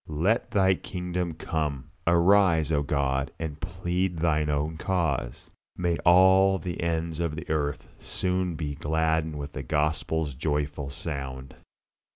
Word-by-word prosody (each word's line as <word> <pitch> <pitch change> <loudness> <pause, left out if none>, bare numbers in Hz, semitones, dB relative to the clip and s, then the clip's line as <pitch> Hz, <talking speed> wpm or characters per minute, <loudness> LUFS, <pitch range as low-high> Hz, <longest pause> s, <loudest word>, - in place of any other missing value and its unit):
Let 85 +10 +1
Thy 95 -2 +4
kingdom 90 -2 -4
come! 75 -5 -3 0.2
Arise, 85 -2 +4
O 75 -2 +2
God, 70 -2 0
and 80 -2 -5
plead 90 0 -2
Thine 80 -2 +1
own 75 +2 -1
cause. 80 -10 -2 0.3
May 85 -2 0
all 95 +2 +6
the 90 +1 -5
ends 85 -1 -1
of 85 -3 -1
the 80 +2 -7
earth 75 -2 -1
soon 90 -1 -1
be 75 -2 -3
gladdened 80 +1 0
with 70 0 -6
the - - -4
Gospel's 75 0 -1
joyful 75 0 -2
sound! 65 -3 -6
80 Hz, 135 wpm, -27 LUFS, 75-90 Hz, 0.3 s, all